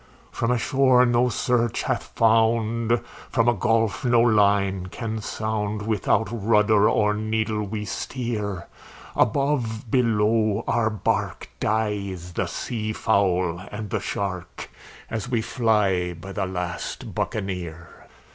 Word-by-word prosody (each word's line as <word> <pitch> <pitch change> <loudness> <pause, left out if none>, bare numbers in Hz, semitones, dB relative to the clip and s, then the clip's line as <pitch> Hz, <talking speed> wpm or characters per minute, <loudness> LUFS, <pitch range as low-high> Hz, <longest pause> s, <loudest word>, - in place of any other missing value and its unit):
"From 115 - -1
a 125 - +3
shore 130 0 +4
no 120 +1 +3
search 120 -2 0
hath - - -1
found, 115 +1 +2 0.3
from 115 0 +2
a 120 - +5
gulf 115 +1 +1
no 120 -2 +4
line 100 -4 +3
can 110 +2 -4
sound, 105 -1 -3
Without 110 +1 +1
rudder 105 -1 +3
or 105 -1 +2
needle 110 0 -1
we 105 +1 -4
steer; 105 -5 -3 0.5
Above, 125 -6 0
below, 110 -3 +2
our 110 -2 +2
bark, 110 -1 -2
dies 100 -5 -2
the - - -1
sea 110 -2 -3
fowl 90 -5 +1
and 105 -2 -6
the - - 0
shark, 90 -3 -4 0.4
As 110 +1 -4
we 120 -3 +1
fly 105 -7 +1
by 90 +4 -9
the 95 -1 -2
last 90 -2 -5
Buccaneer. 90 -5 -5
110 Hz, 125 wpm, -24 LUFS, 100-115 Hz, 0.5 s, a